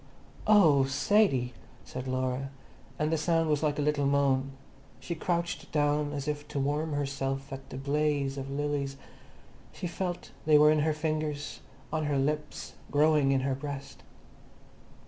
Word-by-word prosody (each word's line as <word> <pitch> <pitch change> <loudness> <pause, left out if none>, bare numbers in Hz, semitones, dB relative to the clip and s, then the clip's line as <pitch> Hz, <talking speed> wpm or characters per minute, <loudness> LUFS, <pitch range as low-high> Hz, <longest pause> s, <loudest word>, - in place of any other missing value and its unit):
"O 185 -10 +6
oh, - - +5
Sadie!" 135 - +2 0.3
said 130 +1 -6
Laura, 130 +1 -1 0.5
and 155 0 0
the 160 - +1
sound 165 0 +2
was 150 - +2
like 150 -2 +1
a 145 - 0
little 145 -1 +1
moan. 135 -1 +2 0.5
She 170 - -4
crouched 170 +1 -2
down 145 -1 +1
as 145 0 -4
if 145 0 -3
to - - -6
warm 150 +3 0
herself 135 -1 -2
at 135 0 -8
that 135 +1 -7
blaze 145 -1 +1
of 135 -1 -5
lilies; 140 -1 -2 0.7
she - - -7
felt 175 0 -4 0.2
they 155 -1 +7
were 150 +1 +7
in 155 - +3
her 155 +1 +2
fingers, 155 -1 -2 0.3
on 155 -1 0
her 145 -1 +1
lips, 150 +2 -2 0.2
growing 150 -1 +4
in 135 -1 +2
her 135 0 0
breast. 140 0 -6
145 Hz, 160 wpm, -29 LUFS, 135-155 Hz, 0.7 s, they